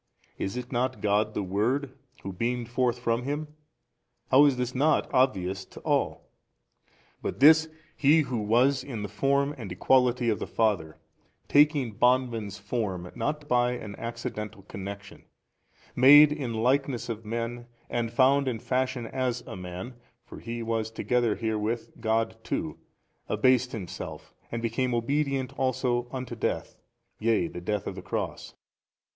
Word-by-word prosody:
is 95 +5 -3
it 125 0 -6
not 125 -2 -1
God 105 +1 +1
the 105 - -1
Word 125 +8 -1 0.3
Who 95 - -5
beamed 120 +4 -2
forth 125 0 +1
from 120 -1 0
Him? 145 +4 -3 0.8
how 140 +3 +8
is 140 -3 +3
this 125 0 -2
not 150 +4 +2
obvious 95 -8 +1
to - - -13
all? - - -1 0.9
But - - -4
this 160 +3 +7 0.3
He 155 +2 +5
Who 130 -5 -2
was 125 +5 +2
in 115 -7 -5
the - - -3
Form 140 +7 +1
and 110 -5 -6
Equality 125 -2 +3
of 105 - -1
the - - -4
Father, 100 -9 0 0.5
taking 145 -4 +4
bondman's 120 -5 +2
form, 100 -4 -3
not 145 +5 -3
by 125 -1 +2
an 105 -4 -7
accidental 105 -3 -6
connection, 100 0 -8 0.7
made 145 +4 +8
in 140 -5 -3
likeness 130 +2 +1
of 115 -2 -5
men 115 +2 -4 0.2
and 115 -1 -2
found 140 +2 +4
in 125 -3 -1
fashion 130 +1 -1
as 125 0 -2
a - - -7
man 90 +6 -7 0.3
(for - - -10
He 115 0 -5
was 115 -1 -1
together 120 0 0
herewith 110 +1 -2
God 115 0 0
too) - - -3 0.5
abased 130 -1 +3
Himself 100 -7 -7 0.2
and 115 0 -3
became 120 +2 0
obedient 135 +2 0
also 125 -2 0
unto 130 -2 -5
death, 115 - -2 0.4
yea 110 -6 +2
the 90 - -8
death 105 +2 -2
of - - -4
the 95 - -8
cross. 95 - -4
120 Hz, 150 wpm, -27 LUFS, 110-130 Hz, 0.9 s, how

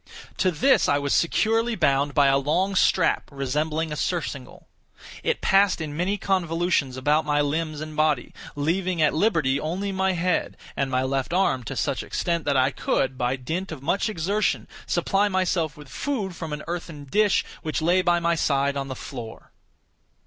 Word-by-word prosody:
To 185 - +2
this 250 - +3
I 145 - +3
was 140 -1 -1
securely 225 +6 +2
bound 140 -5 +1
by 145 -2 +5
a 135 0 +4
long 170 +8 0
strap 185 -2 +2
resembling 150 +4 -2
a - - -2
surcingle. 150 -6 -4 0.5
It - - -1
passed 195 -1 +3
in 150 -2 -5
many 185 +5 0
convolutions 170 -8 0
about 150 +4 +2
my 150 -1 +1
limbs 155 +1 -1
and 155 0 -7
body, 155 -4 +1 0.2
leaving 175 +4 -1
at 155 -2 +3
liberty 155 -7 +2
only 185 +6 -3
my 190 0 +1
head, 180 0 -1 0.2
and 140 - -1
my 130 0 +1
left 135 +3 -1
arm 175 -9 +2
to - - -5
such - - -1
extent 170 -2 -2
that 145 -2 +2
I 130 +1 +3
could, 130 -1 -1
by 125 0 0
dint 165 +9 -4
of 145 -4 -7
much 185 +8 0
exertion, 200 +3 -1 0.2
supply 200 +1 +1
myself 180 -5 0
with 150 -1 -12
food 205 - -3
from 160 -3 -6
an 150 0 -5
earthen 170 -4 -6
dish 205 +9 +2 0.2
which 155 - -2
lay 175 +3 +3
by 175 -1 +2
my 170 0 +1
side 140 -3 +1
on 135 -1 -3
the 130 - -5
floor. 120 -5 -9
160 Hz, 180 wpm, -24 LUFS, 140-185 Hz, 0.5 s, by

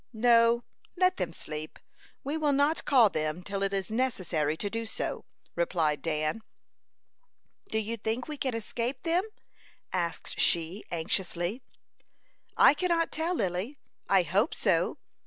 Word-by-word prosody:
"No, 230 +1 +4 0.3
let 365 0 +3
them 170 - -2
sleep. 155 -1 -7 0.5
We 285 +3 -2
will 300 -2 +2
not 285 +3 +2
call 240 -7 +6
them 155 +3 -2
till 200 0 -3
it 195 0 +1
is 195 +1 -2
necessary 185 - 0
to 205 - -2
do 225 +2 -3
so," - - -3 0.3
replied 165 -3 +1
Dan. 155 +5 -1 1.3
"Do 220 - -1
you 220 +2 -2
think 225 +3 -2
we 305 - -4
can 260 -3 -1
escape 235 +3 -3
them?" 340 +2 +2 0.7
asked 175 -2 -3
she, 170 +4 +1
anxiously. 175 +4 -1 1.0
"I - - +8
cannot 335 0 +1
tell, 330 +3 0
Lily. 190 - -2 0.3
I 195 -2 +5
hope 195 - +1
so. - - +1
220 Hz, 140 wpm, -29 LUFS, 175-260 Hz, 1.3 s, I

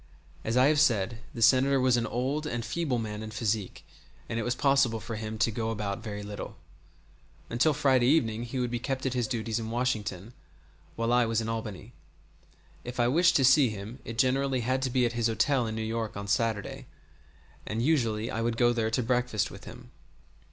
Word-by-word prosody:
As 115 +3 -1
I 130 - +6
have 150 +1 +4
said, 115 -6 +2
the 115 - -2
Senator 135 +3 +5
was 130 -1 +3
an 115 -1 0
old 135 +7 -2
and 120 -4 -3
feeble 135 +2 -1
man 105 -2 -4
in 110 - -6
physique, 110 -2 -3 0.4
and 115 - -2
it - - -1
was 120 +2 -1
possible 135 -5 +2
for 115 +1 -6
him 110 0 -5
to 115 +1 +2
go 110 +1 -2
about 105 -3 -3
very 105 -2 -6
little. 105 0 -7 0.9
Until 125 +7 +3
Friday 130 -4 +3
evening 115 -7 +2
he 120 +3 -5
would 125 -1 -1
be 120 - -2
kept 135 +2 -3
at 130 - 0
his 120 -3 0
duties 115 -2 -2
at 110 - -5
Washington, 110 -4 -2 0.6
while 115 +1 0
I 120 -1 +4
was 115 -1 +1
in 115 - -3
Albany. 110 -4 -5 0.9
If 125 +1 -7
I 120 - +4
wished 170 +5 +4
to 135 - +4
see 130 0 +6
him 110 +4 -7
it 115 - -7
generally 130 +1 +2
had 130 +3 0
to 130 - 0
be 125 0 +2
at 120 - -1
his 120 -1 +1
hotel 115 +3 +1
in 110 - -4
New 110 - -3
York 110 -1 -3
on 100 0 -5
Saturday, 110 0 -1 0.8
and 115 +2 -2
usually 115 -6 +1
I 115 - -2
would 115 0 -1
go 120 0 +4
there 115 -2 0
to 120 +3 0
breakfast 125 -3 0
with - - -11
him. - - -12
115 Hz, 210 wpm, -28 LUFS, 110-130 Hz, 0.9 s, I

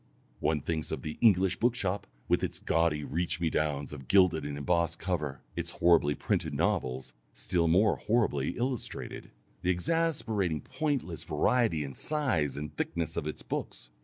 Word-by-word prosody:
One 75 -2 +1
thinks 80 +1 -2
of - - -3
the 75 - -5
English 95 -5 +4
bookshop, 115 -5 0 0.2
with - - +2
its - - -1
gaudy 80 -2 +1
reach 85 +4 -1
me 85 -2 0
downs 75 -2 -1
of 65 -4 -9
gilded 90 -5 +4
and 70 -1 -4
embossed 85 +2 +1
cover, 75 -8 -3
its - - -3
horribly 85 -4 +4
printed - - -1
novels 65 +1 -1 0.2
still 85 -2 0
more 95 +7 +4
horribly 105 - 0
"illustrated," 125 0 -3 0.3
the 90 - 0
exasperating 105 - 0
pointless 140 - -2
variety 80 +2 +2
in 70 - -5
the - - -11
size 105 - 0
and 75 +1 -6
thickness 80 -1 -2
of 75 - -2
its 75 - -4
books. - - -5
85 Hz, 160 wpm, -30 LUFS, 75-100 Hz, 0.3 s, English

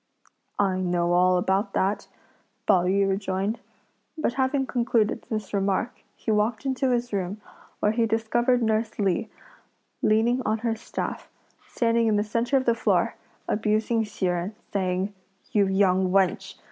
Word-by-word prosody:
"I 190 -2 +1
know 175 -1 +1
all 180 +1 +4
about 190 +4 0
that!" 195 +2 0 0.6
Pao 185 -4 +4
yü 195 +2 +2
rejoined. 195 +3 -1 0.6
But 310 -6 0
having 265 +1 +1
concluded 235 -4 0
this 215 -4 -4
remark, 200 +4 -1
he 220 - -3
walked 215 +4 0
into 265 0 0
his 245 -2 -1
room, 195 +1 -2 0.4
where 210 - +3
he 225 0 +1
discovered 240 +3 +1
nurse 220 0 0
Li, 200 +2 0 0.7
leaning 230 +4 +3
on 215 +1 0
her 225 -1 +1
staff, 225 - -5 0.4
standing 230 -1 +1
in 215 - +3
the 205 - +2
centre 230 +5 0
of 260 - 0
the 235 - +4
floor, 230 - +1 0.3
abusing 215 +2 +1
Hsi 210 -2 -4
Jen, 180 +3 -1 0.2
saying: 190 0 -1 0.4
"You 205 -2 +3
young 190 -1 +2
wench! 195 +2 +1
215 Hz, 145 wpm, -25 LUFS, 190-230 Hz, 0.7 s, all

